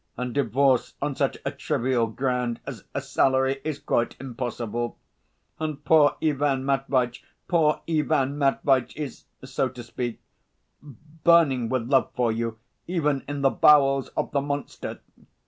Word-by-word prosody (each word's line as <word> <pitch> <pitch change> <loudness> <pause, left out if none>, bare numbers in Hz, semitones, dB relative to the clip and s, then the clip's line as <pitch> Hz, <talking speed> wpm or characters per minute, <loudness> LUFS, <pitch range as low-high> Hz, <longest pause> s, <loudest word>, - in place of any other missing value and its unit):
And 125 -1 -3
divorce 135 0 +2
on 145 -1 -2
such - - 0
a - - 0
trivial 120 -1 0
ground 125 0 -1
as 135 -5 -8
a 140 - 0
salary 135 0 +1
is 155 -3 -3
quite 120 -4 -1
impossible. 120 -2 -4 0.6
And 155 -2 -4
poor 150 0 +5
Ivan 140 -3 +1
Matveitch, 135 -3 0 0.2
poor 155 -3 +2
Ivan 150 -4 +1
Matveitch 135 -2 +1
is, 145 -5 -6 0.2
so 130 0 -1
to 125 -1 -10
speak, 120 0 -5 0.6
burning 150 -2 +2
with 125 -3 -1
love 135 0 +3
for 120 -2 +2
you 115 0 -3 0.3
even 150 -6 0
in 145 0 -4
the 135 -1 +4
bowels 135 -2 +5
of - - -1
the 140 - +1
monster. 145 0 -5
135 Hz, 140 wpm, -25 LUFS, 125-145 Hz, 0.6 s, poor